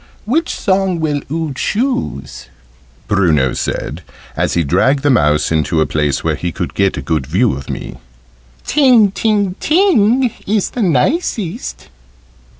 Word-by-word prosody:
"Which 315 +9 0
song 190 -3 0
will 150 -3 -1
oo 160 -2 -2
choose?" 225 - -3 0.6
Bruno 80 - +2
said, - - -4 0.3
as - - -1
he 85 - +2
dragged 130 - +2
the 145 - +3
mouse 75 - +2
into 80 0 +1
a 80 - +3
place 75 -3 -1
where - - +1
he 85 - -3
could - - -4
get 100 -1 +1
a 70 - -5
good 75 -2 -1
view 95 - +2
of 70 +1 -7
me. 65 - -6 0.7
"'Ting, 250 -8 +4
ting, 205 -2 0
ting' 265 - +3 0.2
is 205 0 0
the 245 - -3
nicest." 205 - -1
155 Hz, 145 wpm, -16 LUFS, -, 0.7 s, Ting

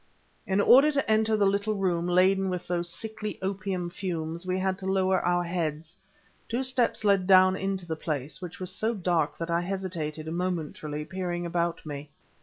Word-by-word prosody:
In 190 +1 +1
order 270 +8 +7
to 280 - 0
enter 220 0 +3
the 205 - +3
little 200 +2 +1
room 180 -3 0
laden 190 +2 +3
with 180 -1 -3
those 175 -1 -1
sickly 215 +1 -5
opium 190 -2 -3
fumes 170 -2 -4
we 185 0 0
had 190 0 -1
to 190 - -5
lower 190 -1 +2
our 175 0 +2
heads. 165 -1 -3 0.5
Two 240 +3 0
steps 255 -4 0
led 200 -3 +3
down 185 -1 +6
into 195 -1 -2
the 160 -1 -3
place, 150 -1 -4
which 180 -2 -7
was 185 -1 -4
so 220 +5 -1
dark 170 -6 0
that 165 0 -4
I 170 +1 +2
hesitated, 175 -5 -3
momentarily, 160 -3 -3
peering 175 -1 -3
about 170 -1 -1
me. 145 -1 -6
185 Hz, 180 wpm, -27 LUFS, 170-195 Hz, 0.5 s, order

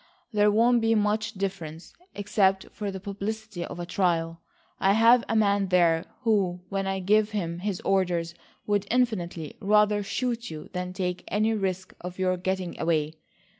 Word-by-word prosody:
There 210 0 +4
won't 235 +3 +4
be 225 0 +3
much 210 0 0
difference, 185 -5 -5 0.2
except 195 -1 +1
for 210 -2 -4
the 190 -1 -5
publicity 200 0 -5
of 175 - -7
a 175 - -3
trial. 170 -2 0 0.4
I've 225 +5 +5
a 225 - +1
man 200 -2 +3
there 170 -3 +3 0.2
who, 195 -7 +1
when 195 -1 -2
I 195 0 -1
give 210 +3 +3
him 170 -3 -3
his 195 0 -3
orders, 175 -3 0 0.3
would 205 -1 0
infinitely 185 - -1
rather 210 0 +3
shoot 235 +3 -2
you 155 -1 -8
than 180 0 -3
take 180 -1 -3
any 215 +2 +1
risk 190 -3 -2
of 180 0 -7
your 185 -1 +1
getting 185 0 -3
away. 155 -2 0
195 Hz, 160 wpm, -27 LUFS, 180-210 Hz, 0.4 s, I've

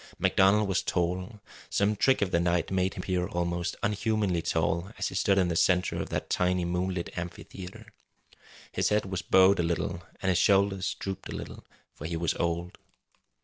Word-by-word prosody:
MacDonald 100 +2 +4
was 95 -1 +1
tall; 90 +5 -2 0.3
some 100 +2 +1
trick 130 +1 +3
of 95 - -2
the 85 - +3
night 85 0 0
made 95 0 0
him - - -5
appear 90 -2 -1
almost 85 0 -2
unhumanly 105 -3 0
tall 85 +3 -1
as - - -1
he - - -9
stood 95 +1 +2
in 95 -2 +3
the 85 - -1
centre 90 +2 +2
of - - -5
that - - -3
tiny 90 -1 +1
moonlit 90 0 -2
amphitheatre. 90 +4 -8 0.9
His - - +1
head 105 -1 +1
was 95 -1 -3
bowed 95 +1 +5
a - - +4
little, 85 0 -2 0.2
and 95 - +1
his 90 -1 +3
shoulders 100 0 +2
drooped 95 -1 -5
a - - -5
little, - - -8 0.3
for 75 - -9
he 85 0 -3
was 85 0 0
old. 85 +1 -2
90 Hz, 185 wpm, -28 LUFS, 85-95 Hz, 0.9 s, bowed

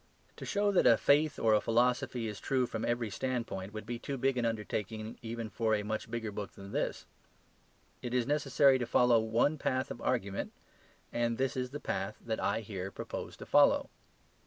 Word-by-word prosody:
To - - -7
show 205 0 +2
that 190 - +4
a 115 - +7
faith 150 +5 +3
or 110 -1 +3
a 105 - +4
philosophy 120 0 +1
is 105 -1 -5
true 130 -2 +1
from - - -4
every 120 -2 -1
standpoint 115 -6 -3
would 110 -1 -7
be 120 +1 -4
too 140 +2 -4
big 135 +1 +1
an 120 -2 0
undertaking 110 0 -3
even 115 -1 -4
for 110 0 +1
a 105 - -2
much 110 +1 -3
bigger 115 -2 -3
book 100 -1 -6
than 100 0 -10
this; - - -2 1.0
it 120 - -4
is 125 -1 +1
necessary 140 -2 +4
to 120 - -2
follow 120 -1 +5
one 115 +7 +1
path 130 -1 -1
of - - -7
argument; 100 -6 -1 0.6
and 120 -1 0
this 135 0 0
is 125 -1 -2
the 145 +3 -6
path 105 -6 -3
that 110 -1 -2
I - - 0
here 95 -3 -5
propose - - -6
to - - -9
follow. - - +4
115 Hz, 195 wpm, -32 LUFS, 110-130 Hz, 1.0 s, a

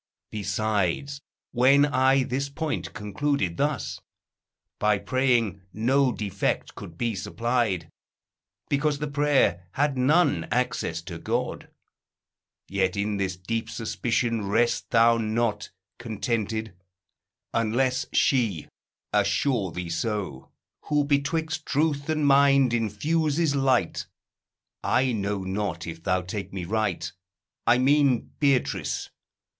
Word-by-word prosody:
Besides, 110 +5 -1 0.3
when 135 +4 +5
I 135 -1 +3
this 135 +3 -2
point 155 +2 -3
concluded 105 -2 -1
thus, 145 -3 -1 0.8
By 105 -1 +3
praying 120 -5 +1
no 130 +4 +2
defect 100 -4 -2
could 85 - -10
be 115 +2 0
supplied: 105 -2 -1 0.8
Because 145 +1 +1
the 150 - -3
prayer 140 -11 +2
had 140 -2 0
none 130 - +3
access 110 -8 -1
to 85 -1 -7
God. - - -3 1.0
Yet 95 -1 0
in 100 0 -1
this 95 -2 -2
deep 115 +5 -3
suspicion 115 -1 -1
rest 120 +4 +1
thou 115 0 +5
not 110 -1 -1 0.3
Contented, 110 -2 -2 0.8
unless 130 +4 +1
she 110 - +1 0.4
assure 105 0 +1
thee 90 -1 -5
so, 90 - -3 0.4
Who 150 -1 +2
betwixt 155 +3 -1
truth 145 0 0
and 155 -2 +1
mind 140 -2 +5
infuses 145 +8 +1
light: 130 -9 +1 0.8
I 130 +2 +2
know 100 -3 -2
not 95 -3 -3
if 85 0 -7
thou 90 +1 0
take 95 +3 -5
me 95 -3 -5
right; 110 +3 -1 0.6
I 120 - +6
mean 135 -2 +3
Beatrice. 140 -4 0
115 Hz, 110 wpm, -26 LUFS, 100-140 Hz, 1.0 s, I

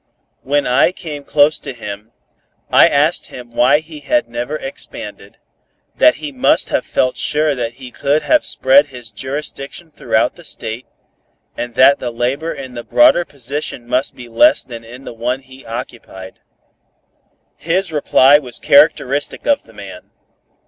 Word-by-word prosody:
When 145 +2 0
I 125 +3 +4
became 155 -5 -7
close 145 +1 +3
to 135 - -7
him, 105 -1 -8 0.6
I - - +7
asked 150 +5 +1
him 120 -1 -11
why 125 +5 +3
he 155 -1 -11
had 135 -4 0
never 120 +5 -4
expanded; 270 - -8 0.6
that 310 - +5
he 300 - -7
must 275 +3 +1
have - - -1
felt 130 - 0
sure 150 0 0
that 120 -3 -4
he 125 0 -11
could 145 +4 0
have 310 -1 +3
spread 140 +3 +4
his 125 -4 -11
jurisdiction 140 +7 -6
throughout - - 0
the - - -14
State, 115 +3 -6 0.7
and 120 -1 -5
that 140 +2 +6
the 125 - -3
labor 130 +7 -2
in 130 -2 -8
the 120 -1 -7
broader 300 - +4
position 140 -2 -5
must 125 +2 -1
be 125 -1 -11
less 300 - +4
than 115 -2 -9
in 125 +4 -12
the - - -8
one 125 +3 -3
he 130 -1 -16
occupied. 115 -5 -8 1.2
His 175 +2 -1
reply 145 -1 +5
was 125 -5 -7
characteristic 145 -1 +2
of 285 -1 +1
the - - -19
man. - - -11
135 Hz, 155 wpm, -17 LUFS, 120-150 Hz, 1.2 s, I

